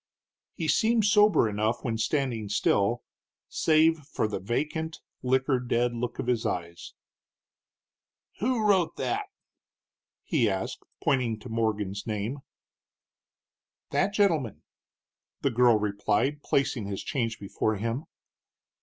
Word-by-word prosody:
He 160 Hz, -, -3 dB
seemed 220 Hz, +8 st, +3 dB
sober 210 Hz, -, +5 dB
enough 110 Hz, +3 st, -1 dB
when 115 Hz, -3 st, -2 dB
standing 115 Hz, -4 st, -1 dB
still, 100 Hz, +3 st, +1 dB, 0.5 s
save 160 Hz, 0 st, +3 dB
for 140 Hz, -6 st, -2 dB
the 105 Hz, -, -3 dB
vacant, 155 Hz, -, -2 dB, 0.2 s
liquor 130 Hz, +1 st, +2 dB
dead 120 Hz, 0 st, 0 dB
look 120 Hz, +1 st, -3 dB
of -, -, -3 dB
his 120 Hz, -2 st, +1 dB
eyes. 85 Hz, -1 st, -4 dB, 1.4 s
"Who 235 Hz, -1 st, +1 dB
wrote 190 Hz, -5 st, +3 dB
that?" 405 Hz, +1 st, -2 dB, 1.0 s
he 130 Hz, -, +2 dB
asked, 95 Hz, -1 st, -3 dB, 0.2 s
pointing 125 Hz, -5 st, +1 dB
to 125 Hz, -, -9 dB
Morgan's 105 Hz, -2 st, -1 dB
name. 110 Hz, +6 st, -3 dB, 1.5 s
"That 195 Hz, -, +2 dB
gentleman," 165 Hz, -, +1 dB, 0.8 s
the 140 Hz, -, +1 dB
girl 120 Hz, -1 st, +5 dB
replied, 105 Hz, +7 st, 0 dB
placing 130 Hz, -8 st, 0 dB
his 100 Hz, -1 st, -4 dB
change 115 Hz, -4 st, -2 dB
before 105 Hz, +2 st, -1 dB
him. 115 Hz, +8 st, -3 dB
120 Hz, 115 wpm, -28 LUFS, 110-155 Hz, 1.5 s, sober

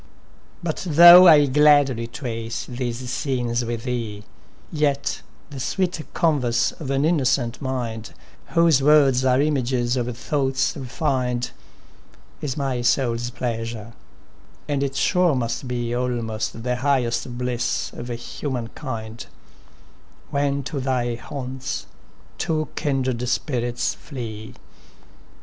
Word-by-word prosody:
i 160 Hz, -, 0 dB
SONNET -, -, -10 dB
13 175 Hz, -5 st, -4 dB
But -, -, -4 dB
thoagh 175 Hz, +1 st, +11 dB
1 170 Hz, -, +10 dB
11 145 Hz, -3 st, +2 dB
gladly 145 Hz, -5 st, +4 dB
trace 115 Hz, -1 st, -5 dB
these 125 Hz, 0 st, -4 dB
scenes 125 Hz, -2 st, -1 dB
with 115 Hz, -1 st, -4 dB
thee, 115 Hz, -5 st, -4 dB, 0.5 s
Yet 145 Hz, -2 st, 0 dB, 0.3 s
the 140 Hz, -, -7 dB
sweet 180 Hz, +5 st, -1 dB
conyerse 130 Hz, -8 st, +2 dB
of 140 Hz, -, -5 dB
an 135 Hz, +1 st, +1 dB
innocent 130 Hz, -7 st, +1 dB
mindy 120 Hz, -4 st, -4 dB, 0.4 s
Whose 165 Hz, -4 st, +3 dB
words 140 Hz, -3 st, +5 dB
are 130 Hz, 0 st, +3 dB
images 130 Hz, -4 st, +1 dB
of 120 Hz, -1 st, -2 dB
thoughts 135 Hz, +2 st, 0 dB
re 135 Hz, -4 st, -6 dB
fin'd, 125 Hz, -3 st, -1 dB, 0.9 s
Is 145 Hz, -3 st, -3 dB
my 135 Hz, -3 st, -1 dB
sours 120 Hz, -1 st, +1 dB
pleasure; 115 Hz, -2 st, -4 dB, 0.7 s
and 145 Hz, -2 st, -1 dB
it 135 Hz, -1 st, -2 dB
sure 180 Hz, +1 st, +2 dB
must 120 Hz, +1 st, -2 dB
be 120 Hz, -1 st, -2 dB
Almost 115 Hz, -3 st, -2 dB
the 125 Hz, 0 st, -1 dB
highest 125 Hz, -2 st, 0 dB
bliss 125 Hz, -1 st, -2 dB
of 120 Hz, -, -7 dB
human 120 Hz, 0 st, -4 dB
kind, 115 Hz, -4 st, -6 dB, 1.1 s
When 140 Hz, -1 st, 0 dB
to 140 Hz, +2 st, -4 dB
thy 125 Hz, -2 st, -1 dB
haunts 130 Hz, +2 st, -5 dB, 0.5 s
two 155 Hz, -1 st, -1 dB
kindred 130 Hz, -4 st, -1 dB
spirits 120 Hz, -3 st, -1 dB
flee. 115 Hz, -4 st, -8 dB
125 Hz, 125 wpm, -23 LUFS, 120-140 Hz, 1.1 s, thoagh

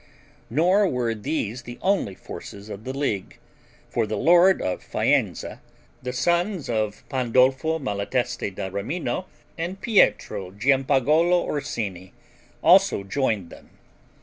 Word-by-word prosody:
Nor 180 Hz, -, +3 dB
were 125 Hz, -6 st, -1 dB
these 115 Hz, 0 st, -3 dB
the 120 Hz, 0 st, -9 dB
only 190 Hz, -, 0 dB
forces 100 Hz, +2 st, -10 dB
of 105 Hz, +1 st, -8 dB
the 130 Hz, +1 st, -4 dB
league, 110 Hz, -9 st, -2 dB, 0.5 s
for 115 Hz, -2 st, -1 dB
the 110 Hz, -, -2 dB
lord 175 Hz, +3 st, +5 dB
of 90 Hz, -, -2 dB
Faenza, -, -, 0 dB, 0.4 s
the 125 Hz, -, -4 dB
sons 175 Hz, -, 0 dB
of 110 Hz, -2 st, -2 dB
Pandolfo 130 Hz, +5 st, +2 dB
Malatesti 120 Hz, -1 st, -2 dB
da 95 Hz, 0 st, -5 dB
Rimino 125 Hz, -, -3 dB, 0.3 s
and 180 Hz, +4 st, -4 dB
Pietro 105 Hz, -, +2 dB
Giampagolo 140 Hz, -, +3 dB
Orsini 105 Hz, -11 st, -4 dB, 0.5 s
also 100 Hz, -, +5 dB
joined 105 Hz, -4 st, -1 dB
them. -, -, -14 dB
125 Hz, 120 wpm, -24 LUFS, 105-160 Hz, 0.5 s, lord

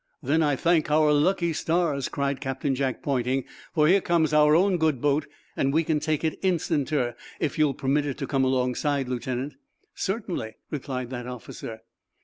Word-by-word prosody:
"Then 160 Hz, +3 st, +2 dB
I 145 Hz, -3 st, +2 dB
thank 165 Hz, +2 st, +2 dB
our 150 Hz, 0 st, +4 dB
lucky 170 Hz, +3 st, +2 dB
stars," 160 Hz, -4 st, 0 dB
cried 140 Hz, -1 st, -2 dB
Captain 135 Hz, +1 st, -1 dB
Jack, 130 Hz, -1 st, -2 dB
pointing, 130 Hz, -1 st, 0 dB, 0.3 s
"for 150 Hz, -2 st, +4 dB
here 190 Hz, +4 st, +5 dB
comes 160 Hz, -4 st, +1 dB
our 150 Hz, 0 st, +6 dB
own 185 Hz, +2 st, +3 dB
good 155 Hz, -5 st, +1 dB
boat, 145 Hz, +2 st, +1 dB, 0.3 s
and 135 Hz, -, +1 dB
we 160 Hz, +3 st, +2 dB
can 155 Hz, -1 st, +1 dB
take 155 Hz, 0 st, -1 dB
it, 160 Hz, -, -1 dB
instanter, 155 Hz, -8 st, 0 dB, 0.3 s
if 155 Hz, -, -2 dB
you'll 150 Hz, -3 st, +3 dB
permit 140 Hz, +3 st, 0 dB
it 140 Hz, -, -3 dB
to 140 Hz, -, -3 dB
come 135 Hz, -1 st, +1 dB
alongside, 130 Hz, +2 st, 0 dB
Lieutenant. 125 Hz, +2 st, -3 dB, 0.4 s
"Certainly," 190 Hz, -, -3 dB, 0.2 s
replied 130 Hz, -4 st, -4 dB
that 125 Hz, -1 st, -5 dB
officer. 115 Hz, -2 st, -8 dB
145 Hz, 170 wpm, -26 LUFS, 130-160 Hz, 0.4 s, our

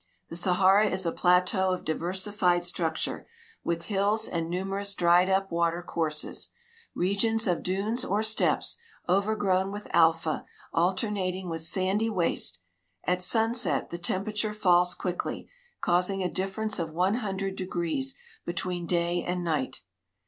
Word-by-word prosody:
The -, -, -6 dB
Sahara 190 Hz, +4 st, +4 dB
is 185 Hz, -2 st, 0 dB
a 165 Hz, -, +1 dB
plateau 180 Hz, +2 st, +2 dB
of 185 Hz, -, -3 dB
diversified 180 Hz, +2 st, 0 dB
structure, 165 Hz, -3 st, -2 dB, 0.4 s
with 170 Hz, 0 st, -2 dB
hills 205 Hz, +3 st, +1 dB
and 165 Hz, -1 st, -3 dB
numerous 195 Hz, +3 st, -2 dB
dried 175 Hz, +1 st, +4 dB
up 195 Hz, 0 st, +1 dB
water 170 Hz, +1 st, 0 dB
courses; 155 Hz, -3 st, -1 dB, 0.5 s
regions 220 Hz, +5 st, +1 dB
of 180 Hz, -4 st, 0 dB
dunes 210 Hz, +7 st, -1 dB
or 215 Hz, -3 st, 0 dB
steppes, 220 Hz, -, +2 dB, 0.3 s
overgrown 195 Hz, 0 st, +1 dB
with 205 Hz, +1 st, -7 dB
alfa, 165 Hz, -1 st, +3 dB, 0.3 s
alternating 185 Hz, +1 st, -1 dB
with 165 Hz, -1 st, -3 dB
sandy 190 Hz, +6 st, +2 dB
waste. 170 Hz, -, 0 dB, 0.5 s
At 180 Hz, 0 st, 0 dB
sunset 225 Hz, -, +2 dB
the 170 Hz, -, -5 dB
temperature 210 Hz, +4 st, -1 dB
falls 180 Hz, -4 st, +3 dB
quickly, 180 Hz, -1 st, -4 dB, 0.3 s
causing 180 Hz, +2 st, +1 dB
a 180 Hz, -, -1 dB
difference 195 Hz, +3 st, -2 dB
of 165 Hz, -2 st, -2 dB
one 180 Hz, +5 st, +1 dB
hun 195 Hz, -3 st, -3 dB
dred 195 Hz, 0 st, -3 dB
degrees 185 Hz, +9 st, -2 dB, 0.3 s
between 175 Hz, 0 st, -3 dB
day 175 Hz, 0 st, 0 dB
and 180 Hz, 0 st, -2 dB
night. 145 Hz, -6 st, -2 dB
185 Hz, 135 wpm, -27 LUFS, 175-200 Hz, 0.5 s, Sahara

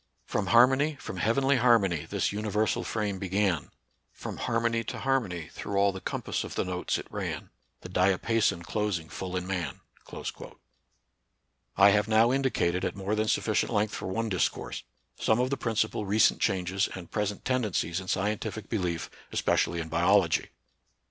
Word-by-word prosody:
From 95 Hz, -, -2 dB
harmony, 130 Hz, +8 st, +5 dB
from 95 Hz, -, -7 dB
heavenly 135 Hz, +8 st, +2 dB
harmony, 110 Hz, -10 st, +3 dB
This -, -, 0 dB
universal 105 Hz, +1 st, 0 dB
frame 105 Hz, -3 st, -2 dB
began, 95 Hz, -4 st, 0 dB, 0.4 s
From -, -, -7 dB
harmony 115 Hz, 0 st, 0 dB
to -, -, -5 dB
harmony 105 Hz, -, -1 dB
Through 100 Hz, -, -4 dB
all 100 Hz, 0 st, +4 dB
the 95 Hz, -1 st, -8 dB
compass -, -, -3 dB
of -, -, -7 dB
the -, -, 0 dB
notes 90 Hz, 0 st, -1 dB
it -, -, -6 dB
ran, -, -, -4 dB, 0.3 s
The 90 Hz, -, -9 dB
diapason 95 Hz, +1 st, +2 dB
closing 95 Hz, -5 st, -2 dB
full 95 Hz, -1 st, -5 dB
in 90 Hz, -, -3 dB
man." 90 Hz, -7 st, -3 dB, 2.0 s
I 100 Hz, +1 st, +8 dB
have 105 Hz, +1 st, +2 dB
now 110 Hz, +2 st, +4 dB
indicated, 125 Hz, -10 st, +1 dB
at -, -, -1 dB
more 100 Hz, +1 st, -2 dB
than 110 Hz, 0 st, +1 dB
sufficient 110 Hz, +1 st, +1 dB
length 105 Hz, -1 st, +1 dB
for -, -, -4 dB
one 115 Hz, +5 st, -1 dB
discourse, 95 Hz, -5 st, -1 dB, 0.4 s
some 110 Hz, -, +2 dB
of 125 Hz, +2 st, +1 dB
the -, -, +2 dB
principal 110 Hz, -3 st, -1 dB
recent 105 Hz, +2 st, +3 dB
changes 95 Hz, -1 st, +1 dB
and 90 Hz, -3 st, -9 dB
present 105 Hz, -1 st, -2 dB
tendencies 105 Hz, -9 st, 0 dB
in 95 Hz, -, -9 dB
scien 100 Hz, +3 st, 0 dB
tific 110 Hz, -2 st, -6 dB
belief, 90 Hz, -7 st, -1 dB, 0.2 s
especially 85 Hz, -, +1 dB
in 80 Hz, -, -4 dB
biology. 85 Hz, +1 st, +3 dB
100 Hz, 160 wpm, -28 LUFS, 90-115 Hz, 2.0 s, I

